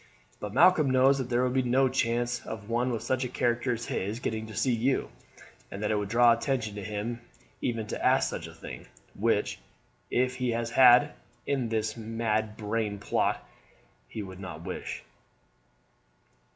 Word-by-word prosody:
But 105 Hz, -, -5 dB
Malcolm 170 Hz, -5 st, +5 dB
knows 130 Hz, +2 st, +4 dB
that 130 Hz, -2 st, -3 dB
there 120 Hz, 0 st, +2 dB
would 125 Hz, 0 st, 0 dB
be 130 Hz, -, +3 dB
no 130 Hz, +2 st, +3 dB
chance 120 Hz, -1 st, 0 dB
of 110 Hz, 0 st, -7 dB
one 120 Hz, +2 st, +1 dB
with 115 Hz, -, -3 dB
such 130 Hz, 0 st, 0 dB
a 125 Hz, -, -3 dB
character 120 Hz, 0 st, 0 dB
as 120 Hz, 0 st, -5 dB
his 105 Hz, +5 st, -3 dB
getting 110 Hz, -3 st, -3 dB
to 110 Hz, -, -9 dB
see 130 Hz, +6 st, +1 dB
you, 125 Hz, +4 st, 0 dB, 0.6 s
and 100 Hz, +2 st, -6 dB
that 105 Hz, -, 0 dB
it -, -, +2 dB
would 105 Hz, -1 st, -2 dB
draw 120 Hz, +1 st, +6 dB
attention 115 Hz, -2 st, -1 dB
to 105 Hz, -1 st, -6 dB
him 105 Hz, +4 st, -4 dB, 0.4 s
even 115 Hz, -3 st, -1 dB
to -, -, -5 dB
ask -, -, +4 dB
such -, -, -5 dB
a -, -, -11 dB
thing, -, -, -9 dB, 0.3 s
which, -, -, 0 dB, 0.5 s
if 130 Hz, +1 st, +1 dB
he 125 Hz, -1 st, -1 dB
has 115 Hz, 0 st, -2 dB
a -, -, -10 dB
hand 130 Hz, +3 st, +7 dB, 0.3 s
in 130 Hz, -5 st, -1 dB
this 110 Hz, -1 st, -1 dB
mad 110 Hz, -1 st, -2 dB
brain 105 Hz, -1 st, -2 dB
plot, 100 Hz, -, -1 dB, 0.6 s
he 110 Hz, -, -6 dB
would 95 Hz, -1 st, -9 dB
not 90 Hz, -4 st, -8 dB
wish." 90 Hz, 0 st, -5 dB
115 Hz, 180 wpm, -28 LUFS, 110-125 Hz, 0.6 s, hand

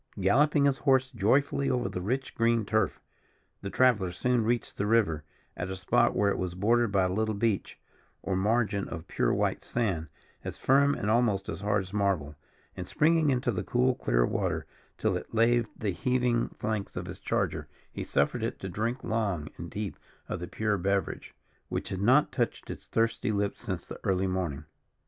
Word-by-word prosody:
Galloping 145 Hz, +1 st, +4 dB
his 140 Hz, -1 st, +2 dB
horse 130 Hz, -2 st, +3 dB
joyously 135 Hz, +5 st, +2 dB
over 125 Hz, -5 st, 0 dB
the 95 Hz, -2 st, -4 dB
rich 130 Hz, +7 st, -2 dB
green 115 Hz, -1 st, +2 dB
turf, 110 Hz, -1 st, 0 dB, 0.6 s
the 100 Hz, -, -4 dB
traveller 110 Hz, -7 st, +3 dB
soon 125 Hz, +5 st, +1 dB
reached 120 Hz, +2 st, -1 dB
the 100 Hz, -, 0 dB
river, 105 Hz, -9 st, +2 dB, 0.3 s
at 90 Hz, -, -4 dB
a 95 Hz, -, -3 dB
spot 120 Hz, +6 st, +2 dB
where 100 Hz, -1 st, +3 dB
it -, -, -2 dB
was 90 Hz, -1 st, -3 dB
bordered 115 Hz, +4 st, +2 dB
by 100 Hz, -1 st, +3 dB
a 90 Hz, 0 st, 0 dB
little 110 Hz, +1 st, 0 dB
beach 105 Hz, -1 st, -1 dB, 0.5 s
or 95 Hz, 0 st, -1 dB
margin 105 Hz, +1 st, +1 dB
of 80 Hz, +1 st, -7 dB
pure -, -, +1 dB
white -, -, 0 dB
sand, 95 Hz, -10 st, -1 dB, 0.4 s
as -, -, -5 dB
firm, 140 Hz, +2 st, +4 dB
and 105 Hz, -, -1 dB
almost 110 Hz, -4 st, +2 dB
as 80 Hz, -, -4 dB
hard 105 Hz, -1 st, +1 dB
as 95 Hz, +2 st, -12 dB
marble; 95 Hz, -8 st, 0 dB, 0.4 s
and -, -, -6 dB
springing 160 Hz, -1 st, +3 dB
into 125 Hz, -2 st, +1 dB
the 90 Hz, -4 st, -2 dB
cool 125 Hz, +5 st, +2 dB
clear -, -, +1 dB
water -, -, -1 dB, 0.3 s
till -, -, +1 dB
it -, -, -6 dB
laved 115 Hz, 0 st, +3 dB
the 105 Hz, -3 st, -1 dB
heaving 120 Hz, +4 st, +1 dB
flanks 110 Hz, -2 st, -4 dB
of -, -, -3 dB
his -, -, -8 dB
charger -, -, -1 dB, 0.2 s
he -, -, -5 dB
suffered -, -, 0 dB
it -, -, -2 dB
to 95 Hz, -, -6 dB
drink 115 Hz, +7 st, -2 dB
long 100 Hz, -9 st, -1 dB
and 85 Hz, -, -6 dB
deep 105 Hz, -2 st, -5 dB, 0.3 s
of -, -, -3 dB
the 90 Hz, -, -5 dB
pure 105 Hz, 0 st, -1 dB
beverage, 100 Hz, +1 st, -2 dB, 0.3 s
which -, -, -3 dB
had 95 Hz, 0 st, -3 dB
not 130 Hz, +8 st, +4 dB
touched 120 Hz, -4 st, -2 dB
its -, -, -9 dB
thirsty 115 Hz, 0 st, 0 dB
lips 100 Hz, -1 st, -1 dB
since 95 Hz, -7 st, -4 dB
the -, -, -8 dB
early 95 Hz, -2 st, +1 dB
morning. 90 Hz, -7 st, -2 dB
110 Hz, 190 wpm, -29 LUFS, 95-120 Hz, 0.6 s, Galloping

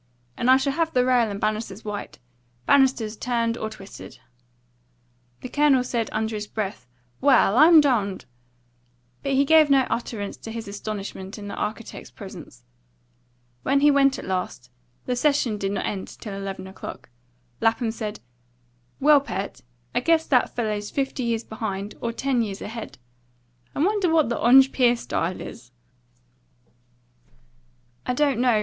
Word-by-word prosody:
And 245 Hz, -, 0 dB
I 260 Hz, -, +8 dB
should 275 Hz, +1 st, 0 dB
have 325 Hz, +1 st, 0 dB
the 250 Hz, -1 st, +3 dB
rail 245 Hz, -3 st, +3 dB
and 200 Hz, -1 st, -5 dB
banisters 215 Hz, -1 st, -3 dB
white 210 Hz, -1 st, -6 dB, 0.5 s
banisters 255 Hz, -, +3 dB
turned 230 Hz, -1 st, -1 dB
or 220 Hz, -2 st, -4 dB
twisted." 200 Hz, -2 st, -11 dB, 1.2 s
The -, -, -5 dB
Colonel 285 Hz, -2 st, +3 dB
said 235 Hz, -3 st, -2 dB
under 220 Hz, +1 st, -2 dB
his 210 Hz, -1 st, -4 dB
breath, 200 Hz, -, -5 dB, 0.3 s
"Well, 260 Hz, -7 st, +5 dB
I'm 320 Hz, +4 st, +8 dB
dumned!" 220 Hz, -, +1 dB, 1.0 s
but 275 Hz, -, -1 dB
he 275 Hz, +1 st, +3 dB
gave 315 Hz, 0 st, +6 dB
no 275 Hz, -1 st, +5 dB
utterance 220 Hz, -4 st, -3 dB
to 225 Hz, -, -9 dB
his 225 Hz, -1 st, -6 dB
astonishment 200 Hz, -1 st, -6 dB
in 205 Hz, -1 st, -7 dB
the -, -, -6 dB
architect's 220 Hz, +1 st, -5 dB
presence. -, -, -11 dB, 1.0 s
When 275 Hz, +1 st, +2 dB
he 295 Hz, 0 st, +6 dB
went 275 Hz, -1 st, +4 dB
at -, -, -7 dB
last, 180 Hz, -9 st, -4 dB, 0.3 s
the 250 Hz, -, -1 dB
session 250 Hz, -5 st, +1 dB
did 195 Hz, 0 st, -1 dB
not 200 Hz, -, -2 dB
end 195 Hz, -2 st, -3 dB
till 210 Hz, -4 st, -9 dB
eleven 195 Hz, -1 st, -5 dB
o'clock, 190 Hz, -8 st, -9 dB, 0.5 s
Lapham 225 Hz, 0 st, +1 dB
said, 215 Hz, -2 st, -6 dB, 0.8 s
"Well, 295 Hz, 0 st, +6 dB
Pert, 200 Hz, -7 st, -5 dB, 0.3 s
I -, -, +2 dB
guess 320 Hz, +4 st, +2 dB
that 255 Hz, -3 st, +2 dB
fellow's 210 Hz, -3 st, -2 dB
fifty 270 Hz, -1 st, -2 dB
years 235 Hz, -2 st, -1 dB
behind, 210 Hz, -2 st, -5 dB
or 235 Hz, -, -1 dB
ten 255 Hz, +1 st, 0 dB
years 200 Hz, -3 st, -3 dB
ahead. 225 Hz, +1 st, -7 dB, 0.8 s
I 290 Hz, -, +1 dB
wonder 400 Hz, -3 st, +1 dB
what 320 Hz, -5 st, +3 dB
the 235 Hz, -, -2 dB
Ongpeer 255 Hz, -1 st, +5 dB
style 180 Hz, -5 st, -2 dB
is?" 120 Hz, 0 st, -10 dB, 2.3 s
"I 250 Hz, -, -2 dB
don't 280 Hz, -3 st, +2 dB
know. 245 Hz, -3 st, +3 dB
230 Hz, 150 wpm, -24 LUFS, 210-270 Hz, 2.3 s, I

